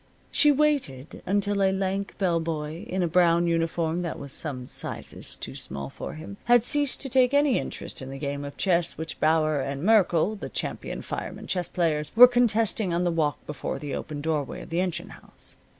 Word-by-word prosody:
She 295 - +5
waited 275 - 0
until 200 +1 +1
a 190 - +4
lank 195 +1 -2
bell 175 -4 +1
boy, 160 0 -4
in 185 0 0
a - - +2
brown 170 0 +4
uniform 165 0 0
that 170 -2 -3
was 140 -1 -3
some 130 -6 -1
sizes - - -4
too - - -7
small 70 0 -4
for - - -7
him, 165 +6 -9
had 240 -1 +5
ceased 290 +1 -1
to 275 - -4
take 260 +1 +3
any 285 -3 +4
interest - - -6
in 130 - -7
the 135 - -6
game 140 0 -3
of 140 0 -8
chess 175 -3 +1
which 160 0 -5
Bauer 155 -1 +3
and 140 +2 -3
Merkle, 200 -2 +3
the 200 - -7
champion - - -4
firemen - - -6
chess 180 -2 -2
players, 150 -4 0
were 245 +2 +11
contesting 225 -5 +1
on 170 +1 +1
the 175 - +1
walk 155 -3 -1
before 150 - -4
the 145 -2 -5
open 150 -2 -5
doorway 150 -3 -2
of - - -13
the 170 +2 +1
engine 180 0 -3
house. - - -11
170 Hz, 200 wpm, -26 LUFS, 155-200 Hz, -, were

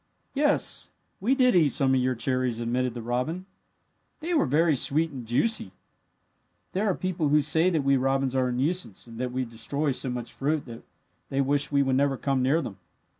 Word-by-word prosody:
"Yes, 290 +1 +1 0.3
we 245 +7 +2
did 250 -4 +3
eat 160 -5 +5
some 135 -1 +2
of 130 - +3
your 130 0 0
cherries," 125 -1 -1
admitted 120 +1 -1
the 120 - -6
robin. 125 +10 -2 0.7
"They 335 +3 -3
were 315 - +2
very 155 +4 +3
sweet 155 +5 +2
and 125 -5 -8
juicy. 180 - +1 1.0
"There 200 +2 0
are 185 - +1
people 175 -5 -1
who 150 +1 +4
say 160 +5 +3
that 160 -5 0
we 140 0 +3
robins 135 0 0
are 130 -1 +2
a - - -1
nuisance, 130 - -2
and 115 -1 -11
that 125 -1 -2
we 130 +1 -2
destroy 125 +6 -2
so 130 0 -2
much 120 -1 -5
fruit 150 +2 -1
that 115 -1 -10 0.5
they 135 - -2
wish 140 +2 +1
we 140 -1 +3
would 130 -1 +1
never 140 -1 +1
come 135 -1 0
near 145 +6 +2
them. 100 -3 -8
135 Hz, 200 wpm, -26 LUFS, 125-160 Hz, 1.0 s, eat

